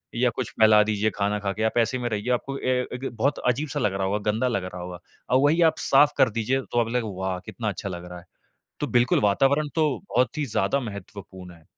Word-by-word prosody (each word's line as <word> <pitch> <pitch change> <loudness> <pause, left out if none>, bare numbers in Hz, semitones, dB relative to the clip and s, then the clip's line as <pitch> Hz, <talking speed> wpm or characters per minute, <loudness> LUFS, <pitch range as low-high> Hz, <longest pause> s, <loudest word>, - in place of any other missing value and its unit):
या 125 +1 +2
कुछ - - -3
फैला 110 -1 +7
दीजिए 105 0 0
खाना 105 +1 0
खाके, 100 +2 -3
आप 110 +2 0
ऐसे 120 +2 +2
में 120 - -2
रहिए 105 +2 -3
आपको 135 +3 -3
ए 130 0 0
एक 125 +2 -5
बहुत 140 +6 0
अजीब-सा 135 +3 -1
लग 105 - 0
रहा 95 0 -2
होगा, 100 +2 0
गंदा 115 +4 0
लग 115 -7 -1
रहा 90 -1 -7
होगा। 90 0 -7 0.3
अब 130 +1 +4
वही 160 +4 +3
आप - - -8
साफ़ 145 +2 +4
कर - - +5
दीजिए 115 +4 -1
तो 120 - +1
अब 115 - -2
लग 125 - +1
वाह! 95 -1 -2
कितना 110 -3 -4
अच्छा 100 +1 -5
लग 90 -1 -7
रहा 90 0 -8
है, 85 - -18 0.6
तो - - -1
बिल्कुल, 120 +1 +2
वातावरण 135 +9 +2
तो 155 -2 +2 0.3
बहुत 130 +5 +1
ही 150 - 0
ज़्यादा 110 +3 0
महत्वपूर्ण 100 -4 -9
है। 80 -2 -20
110 Hz, 235 wpm, -25 LUFS, 100-130 Hz, 0.6 s, फैला